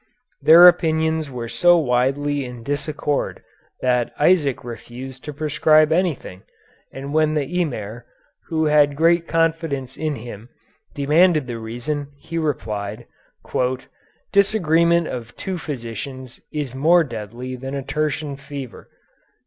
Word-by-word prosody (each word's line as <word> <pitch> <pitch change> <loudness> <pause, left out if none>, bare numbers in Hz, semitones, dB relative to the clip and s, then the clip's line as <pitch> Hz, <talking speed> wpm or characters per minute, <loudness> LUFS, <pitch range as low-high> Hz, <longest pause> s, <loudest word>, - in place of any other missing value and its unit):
Their 170 +3 +9
opinions 160 -3 +2
were 120 -3 -5
so 175 +8 +4
widely 140 +1 +1
in 125 -2 -8
disaccord 145 +1 -2 0.4
that 125 -2 +1
Isaac 150 -4 +3
refused 125 +2 -9
to 150 - -4
prescribe 155 +1 +3
anything, 160 - -1 0.5
and 140 +2 -7
when 155 0 +2
the 150 - +1 0.2
Emir, 120 -6 -5 0.4
who 160 -1 0
had 150 -1 +4
great 165 +2 +3
confidence 160 -5 -1
in 155 -1 -2
him, 115 -1 -9 0.5
demanded 155 +2 +3
the 120 -2 -5
reason, 120 +6 -4
he 165 +3 -5
replied, 110 -7 -3 1.3
"disagreement 170 -5 +3
of 120 -1 -7
two 185 -2 -4
physicians 130 -2 -7
is 145 -5 -4
more 165 +6 +4
deadly 120 0 -6
than 135 +2 -6
a 140 - -3
tertian 150 0 -2
fever." 135 -3 -9
145 Hz, 120 wpm, -21 LUFS, 125-160 Hz, 1.3 s, Their